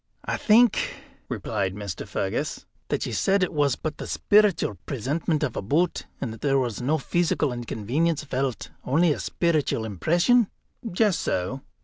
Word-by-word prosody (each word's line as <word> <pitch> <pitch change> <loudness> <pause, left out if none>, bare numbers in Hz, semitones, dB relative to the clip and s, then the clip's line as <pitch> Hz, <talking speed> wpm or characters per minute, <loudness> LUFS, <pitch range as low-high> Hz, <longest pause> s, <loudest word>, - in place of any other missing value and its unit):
"I - - -1
think," 230 +1 +4 0.3
replied 100 -4 -2
Mr. 100 -6 -6
Fergus, - - -2 0.2
"that - - -1
you - - -4
said 195 0 +2
it 180 - -1
was 145 -4 +2
but 155 -1 -5
the - - -5
speeritual 205 - +3
presentment 150 +5 -1
of 130 -6 -1
a - - -2
boot, 155 - 0
and 115 -5 -3
that 115 - -12
there 135 -1 +2
was 125 -5 -1
no 145 +6 +1
pheesical 155 -2 0
inconvenience 125 +7 -1
felt, 135 -3 -3
only 155 +4 +3
a - - -6
speeritual 155 -9 0
impression?" 175 - +3 0.4
"Just 200 +1 +2
so." 95 +10 -2
145 Hz, 155 wpm, -25 LUFS, 120-175 Hz, 0.4 s, think